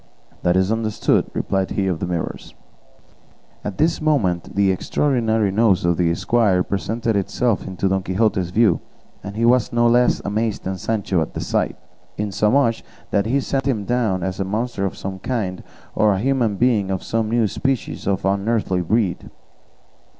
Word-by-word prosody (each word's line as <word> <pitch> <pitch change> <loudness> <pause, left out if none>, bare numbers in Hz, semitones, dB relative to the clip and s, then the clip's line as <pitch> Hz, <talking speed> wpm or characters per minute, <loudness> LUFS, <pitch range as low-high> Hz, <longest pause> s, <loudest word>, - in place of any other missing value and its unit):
"That 90 +1 +2
is 95 +2 +2
understood," 110 -1 +1
replied 95 -1 -1
he 100 - -1
of 90 -4 -1
the - - -2
Mirrors. 85 -2 -4 1.1
At 100 - -5
this 160 +2 +1
moment 105 - 0
the 100 -1 +3
extraordinary 110 0 +1
nose 100 -3 +3
of 85 -1 +2
the 85 -1 +2
squire 100 -3 +2
presented 110 +4 -2
itself 105 +3 0
to 100 - +1
Don 95 0 +1
Quixote's 95 -1 0
view, 105 -2 +3 0.4
and 100 +1 -7
he 115 +2 +1
was 120 -1 +3
no 120 0 +2
less 120 +1 +3
amazed 110 +1 -1
than 95 0 -4
Sancho 100 -4 0
at 80 - -4
the - - -3
sight; - - -1 0.4
insomuch 105 +4 +1 0.3
that 100 +1 +1
he 135 +4 +2
set 135 0 -2
him 110 -7 0
down 110 -7 0
as 95 +1 -3
a - - +1
monster 105 +1 -2
of - - -7
some 95 0 -5
kind, 95 -5 -3 0.3
or 105 -1 +3
a 95 - -1
human 120 -3 +1
being 110 -3 +2
of 95 -1 -2
some 115 -1 -1
new 115 0 +2
species 130 +2 -2
or 100 -1 +2
unearthly 100 -1 0
breed. 95 +1 0
105 Hz, 170 wpm, -21 LUFS, 95-115 Hz, 1.1 s, the